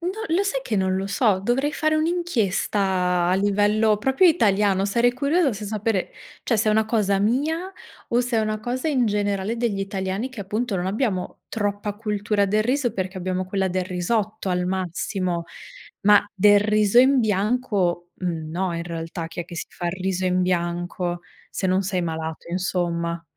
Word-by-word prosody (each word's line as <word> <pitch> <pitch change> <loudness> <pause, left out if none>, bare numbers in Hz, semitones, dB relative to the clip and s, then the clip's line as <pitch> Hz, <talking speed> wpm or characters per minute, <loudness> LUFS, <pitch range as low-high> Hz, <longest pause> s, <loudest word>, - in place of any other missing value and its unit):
n 350 +2 -2 0.2
lo 385 - +3
sai 275 -9 -1
che 235 - -3
non 190 -1 +1
lo 195 +1 -2
so. 200 -1 +2
Dovrei 255 +8 +1
fare 310 +1 +1
un'inchiesta 200 - 0
a 185 - +3
livello 205 +2 +2
proprio 265 - +3
italiano. 200 - +3
Sarei 235 +4 +2
curiosa 285 +3 +1
se 210 0 -6
sapere, 215 -2 -1 0.3
cioè 230 - +1
se 215 +1 +1
è - - +4
una 220 +1 +3
cosa 210 -3 +1
mia 300 - 0 0.4
o 240 +1 +2
se 245 -1 -1
è - - +3
una 215 0 -1
cosa 250 +6 -2
in 265 -5 +2
generale 205 +1 -1
degli 225 -4 -1
italiani 195 +4 -3
che 250 -5 -8
appunto 210 +2 -2
non 180 0 -2
abbiamo 200 -2 -2
troppa 205 -1 -2
cultura 210 -1 0
del 210 +2 +2
riso 245 0 0
perché 190 -1 -3
abbiamo 185 0 -2
quella 190 0 -1
del 185 0 -1
risotto, 205 +3 -2
al 180 -1 0
massimo. 185 -1 -2 0.6
Ma 205 0 +6
del 205 +1 +6
riso 210 +1 +3
in 260 +1 +6
bianco 200 -4 0
no, 170 +1 -2
in 170 - -3
realtà. 165 0 -5
Chi 165 +2 -6
è - - -4
che 170 0 -10
si - - -4
fa 175 - -6
il - - -2
riso 190 0 -1
in 180 0 +2
bianco? 175 0 -1 0.3
Se 190 - -2
non 185 +1 +2
sei 185 -1 -1
malato, 160 -1 -4
insomma. 170 -2 -1
200 Hz, 180 wpm, -23 LUFS, 185-225 Hz, 0.6 s, Ma